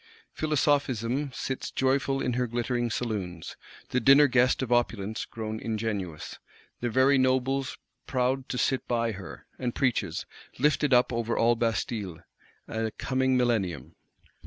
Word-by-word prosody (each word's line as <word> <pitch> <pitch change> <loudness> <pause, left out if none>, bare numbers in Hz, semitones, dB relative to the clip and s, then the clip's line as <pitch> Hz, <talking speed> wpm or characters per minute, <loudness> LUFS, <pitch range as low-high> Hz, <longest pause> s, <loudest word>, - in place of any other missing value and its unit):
Philosophism 140 -3 0
sits 130 +1 -4
joyful 135 +1 +1
in 125 - 0
her 125 +1 0
glittering 120 +1 -1
saloons, 100 -8 -4 0.3
the 125 - +1
dinner 135 +4 +7
guest 125 0 +3
of 125 - -4
Opulence 110 -3 0
grown 110 -1 -5
ingenuous, 105 -8 -4 0.4
the 120 - -1
very 130 +3 +4
nobles 130 +1 +1 0.3
proud 130 -1 0
to 125 - -2
sit 130 +1 0
by 115 -1 +1
her; 95 -2 -9
and 125 -2 -2
preaches, 105 - 0 0.3
lifted 150 +1 +2
up 125 0 +4
over 115 0 -1
all 120 +1 +4
Bastilles, 110 -5 -2 0.4
a 110 0 -2
coming 130 0 +1
millennium. 115 -8 0
120 Hz, 135 wpm, -28 LUFS, 110-130 Hz, 0.4 s, dinner